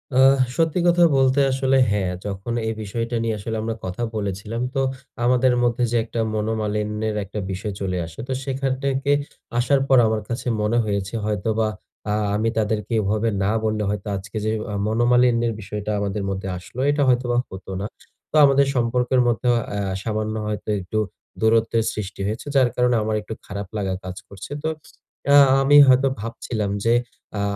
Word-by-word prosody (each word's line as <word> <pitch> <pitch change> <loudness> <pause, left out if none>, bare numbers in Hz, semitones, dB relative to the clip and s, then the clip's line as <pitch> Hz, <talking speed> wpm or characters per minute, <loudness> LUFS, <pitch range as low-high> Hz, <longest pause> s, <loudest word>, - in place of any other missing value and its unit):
আ - - +3 0.4
সত্যি 165 +1 +1
কথা 175 0 +5
বলতে 130 +1 +3
আসলে 135 0 +2
হ্যাঁ, 95 -3 0
যখন 100 +3 -4
এই 110 - 0
বিষয়টা 115 +3 -3
নিয়ে 115 -1 0
আসলে 110 +2 -4
আমরা 115 0 -2
কথা 95 +6 -4
বলেছিলাম, 105 +3 -3
তো 135 - +2 0.4
আমাদের 125 +1 +4
মধ্যে, 120 0 +1
যে, 120 - +2
একটা 115 +1 -5 0.2
মনোমালিন্যের 105 0 -1
একটা 105 +2 -6
বিষয় 95 +2 -4
চলে 90 -2 -1
আসে। 80 0 -12
তো 130 - -1
সেখান 135 0 -1
থেকে 140 +1 0 0.5
আসার 135 +2 +3
পর 135 - +5
আমার 110 0 0
কাছে 120 +1 -4
মনে 105 +3 +1
হয়েছে 100 -2 -2
হয়তোবা 110 +1 0 0.4
আ - - +2 0.2
আমি 110 +2 +1
তাদেরকে 110 +1 -1
এভাবে 105 +3 0
না 100 - +2
বললে 110 -1 0
হয়তো 105 0 -3
আজকে 105 +3 -7
যে, 110 - +1 0.2
আ - - -4
মনোমালিন্যের 120 0 +3
বিষয়টা 105 +2 -4
আমাদের 100 0 -2
মধ্যে 95 0 -3
আসলো, 90 +7 -10
এটা 145 0 0
হয়তোবা 120 -1 +2
হতো 95 +1 -9
না। - - -2 0.5
তো - - -5
আমাদের 140 0 +4
সম্পর্কের 125 +1 +2
মধ্যে 120 +1 0 0.3
আ - - -2 0.3
সামান্য 110 -1 -2
হয়তো 105 0 -4
একটু 95 +3 -4 0.4
দূরত্বের 115 0 +3
সৃষ্টি 100 -1 -6
হয়েছে। 110 +3 -4
যার 130 -2 +5
কারণে 125 0 +3
আমার 110 0 -1
একটু 110 - -7
খারাপ 100 0 -6
লাগা 95 -2 -1
কাজ 90 0 -6
করছে। 100 +5 -10
তো 160 - 0 0.6
আ - - +8 0.3
আমি 145 +2 +6
হয়তো 130 +1 +5
ভাবছিলাম 115 -2 -3
যে, 115 - +4 0.4
আ - - -1
110 Hz, 170 wpm, -22 LUFS, 105-125 Hz, 0.6 s, আ